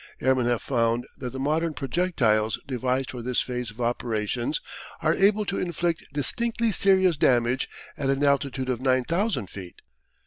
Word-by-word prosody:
Airmen 130 -2 +2
have 120 -2 0
found 115 -2 +1
that 125 - -4
the 130 - -7
modern 155 +3 0
projectiles 125 -8 +1
devised 130 -1 -1
for 125 - -6
this 125 +1 0
phase 125 -2 -2
of 105 +3 -13
operations 120 +2 -1 0.4
are 155 +1 +4
able 205 +3 +3
to 195 - -2
inflict 170 -1 -2
distinctly 230 - 0
serious 190 -4 +3
damage 125 -1 +2 0.3
at 135 -2 0
an 135 +1 +1
altitude 140 -2 +1
of 125 -1 -1
9,000 135 - +1
feet. 90 -2 -10
130 Hz, 150 wpm, -26 LUFS, 120-165 Hz, 0.4 s, are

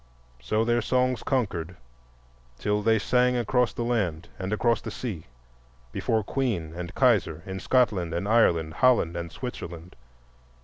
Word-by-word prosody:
So 110 - 0
their 120 0 +2
songs 125 +1 +1
conquered 95 - -2 0.8
till 105 +10 0
they 110 +1 +3
sang 125 +3 +2
across 120 0 +1
the 120 - -4
land 90 -9 -1
and 95 +1 -3
across 115 +1 +1
the - - -6
sea, 100 -11 -6 0.6
before 110 - 0
Queen 100 - -2
and 90 +1 -7
Kaiser, 100 - +2
in 95 0 -5
Scotland 100 -8 +1
and 85 +4 -2
Ireland, 85 -8 +3
Holland 120 -7 +3
and 85 -1 -5
Switzerland. 85 -8 -7
105 Hz, 140 wpm, -26 LUFS, 85-120 Hz, 0.8 s, they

